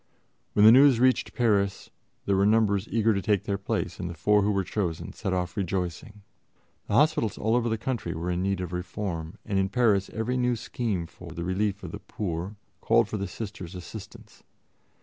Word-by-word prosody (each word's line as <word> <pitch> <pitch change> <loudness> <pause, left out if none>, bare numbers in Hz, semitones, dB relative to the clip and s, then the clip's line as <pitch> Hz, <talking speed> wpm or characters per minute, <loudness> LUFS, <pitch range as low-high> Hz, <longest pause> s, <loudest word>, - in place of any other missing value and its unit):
When 105 - +5
the 110 - +10
news 135 -1 +7
reached 130 +1 +2
Paris, 100 -5 +1 0.3
there 100 - +2
were 100 +1 +3
numbers 105 -2 +2
eager 115 -1 +2
to 100 - -1
take 105 -2 +1
their 100 -1 -2
place, 100 - -3
and 90 - -3
the 85 - -6
four 105 +7 +3
who 100 - +1
were 100 -2 +1
chosen 90 -5 -3
set 95 - -3
off 90 -1 -2
rejoicing. 95 +2 -3 0.6
The 105 - -1
hospitals 145 -7 +3
all 110 +2 +1
over 120 -1 +1
the 110 - 0
country 115 -8 -3
were 85 +2 -2
in 90 0 -1
need 95 0 0
of 90 -1 -5
reform, 90 -2 -4
and 100 -2 0
in 95 0 +1
Paris 105 -4 +2
every 115 +3 -2
new 125 -1 +1
scheme 110 -6 -3
for 85 +1 -12
the 85 - -5
relief 100 +3 -1
of - - -6
the 105 - -6
poor 95 -1 -4 0.3
called 115 -2 +3
for 110 - -3
the 100 0 -3
Sisters' 95 -3 -7
assistance. 90 +3 -10
100 Hz, 200 wpm, -27 LUFS, 90-110 Hz, 0.6 s, the